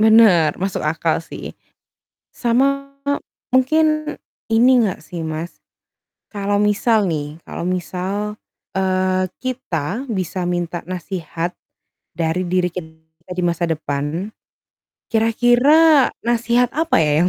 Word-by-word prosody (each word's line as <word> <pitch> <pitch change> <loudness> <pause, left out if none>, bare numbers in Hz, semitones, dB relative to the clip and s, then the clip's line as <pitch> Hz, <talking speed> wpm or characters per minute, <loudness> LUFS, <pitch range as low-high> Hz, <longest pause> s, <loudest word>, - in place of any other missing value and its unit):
Benar, 215 -8 +6
masuk 190 0 -2
akal, 160 +1 0
sih. 165 - -8 0.8
Sama 275 +3 +1 0.6
mungkin 305 +3 +2 0.4
ini 235 +3 +5
enggak, 195 -5 -1
sih, 165 +2 -7
Mas, 160 +2 -5 0.7
kalau 205 -1 -1
misal, 210 +1 +3
nih, 150 -4 -3
kalau - - -6
misal, 190 +4 -3 0.3
eee, 185 0 +1
kita 245 - -3
bisa 185 -4 -2
minta 175 -1 -2
nasihat, 175 -1 -4 0.6
dari 165 +2 0
diri 180 0 +2
kita 160 -1 -11
di 180 - -1
masa 170 0 0
depan, 155 +5 -3 0.8
kira-kira 245 +7 +5 0.2
nasihat 240 +1 +2
apa, 325 +2 +1
ya, 150 -1 +3
yang - - +3
185 Hz, 110 wpm, -20 LUFS, 170-235 Hz, 0.8 s, Benar